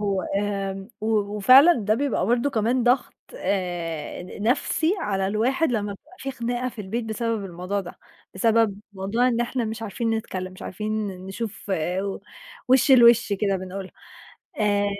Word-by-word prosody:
وآمم، 195 0 -2
و 215 - -3 0.3
وفعلًا 260 - +8
ده 215 -8 +1
بيبقى 275 +2 0
برضو 240 +4 +2
كمان 235 +2 +1
ضغط 250 +2 +2 0.2
آآ، 175 - -3
ن 185 +3 -9
نَفسي 290 - +1
على 195 -2 -1
الواحد 245 +9 +1
لمّا 205 -3 -1
بتبقى 285 - -16
في 270 - -4
خناقة 245 0 -2
في 235 -3 -9
البيت 220 +4 -3
بسبب 225 -1 -2
الموضوع 185 +2 -3
ده، 175 -2 -10 0.4
بسبب 220 0 +2
موضوع 205 +6 +1
إن 235 -1 0
إحنا 240 0 -1
مش 220 +1 -5
عارفين 225 +2 -2
نتكلم، 185 -4 -3
مش 185 - -12
عارفين 215 +2 -3 0.2
نشوف 205 +2 -6 0.4
و 195 0 -3 0.5
وشّ 260 +2 +4
لوش 240 -3 +6
كده 200 -1 +1
بنقولها، 185 +1 -7 0.7
آآ 205 -1 +2
215 Hz, 150 wpm, -24 LUFS, 195-240 Hz, 0.7 s, وفعلًا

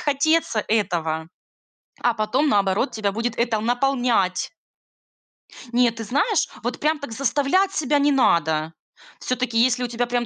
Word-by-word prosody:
хотеться 290 -5 +1
этого, 165 -7 -1 0.8
а 240 - +2
потом 230 +7 0
наоборот 200 +3 +1
тебя 210 -2 -2
будет 230 +3 -3
это 235 -2 0
наполнять. 245 -5 0 1.2
Нет, 240 -1 +3
ты 225 - -5
знаешь, 290 - +1 0.2
вот - - -3
прям 305 0 0
так 280 -5 -8
заставлять 285 - +1
себя 295 -3 +1
не 290 +1 +3
надо. 160 - +1 0.5
Всё-таки, 255 -2 -2
если 250 +1 +3
у - - -1
тебя 240 +1 -2
прям 240 0 -1
240 Hz, 140 wpm, -22 LUFS, 215-275 Hz, 1.2 s, Нет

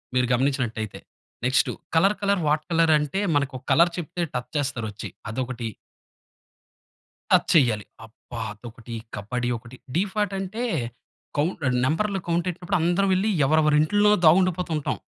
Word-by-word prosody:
మీరు 125 -1 +3
గమనించినట్లయితే. 125 -5 -1 0.5
Next 130 +1 +3 0.3
colour 195 +6 +4
colour, 200 -2 +1
what 150 +1 +2
colour 165 -1 +4
అంటే, 160 +7 -2
మనకు 140 -2 0 0.2
కలర్ 170 +1 +5
చెప్తే 175 +1 -3
టచ్ 125 0 -4
చేస్తారు 135 -6 -2
వచ్చి 100 - -7 0.2
అదొకటి. 125 -1 -3 1.6
టచ్ - - +5
చెయ్యాలి. 115 - +3 0.2
అబ్బా! 115 +1 -11
అదొకటీ, 115 +1 -10 0.2
కబాడ్డీ 120 +4 -3
ఒకటి, 115 +2 -13 0.2
డీఫాట్ 200 +2 0
అంటే 195 +5 -4 0.7
కౌంట్ 160 +3 0
అహ్, 125 - +1
నంబర్‌లు 195 +7 0
కౌంట్ 170 +1 0
ఎట్టినప్పుడు 180 +3 -2
అందరం 175 +4 +2
వెళ్లి 195 +4 +1 0.2
ఎవరెవరి 155 +1 +3
ఇంట్లో 205 +6 +3
దాగుండిపోతూ 180 +1 +4
ఉంటాం. 150 - -2
155 Hz, 135 wpm, -25 LUFS, 125-185 Hz, 1.6 s, కలర్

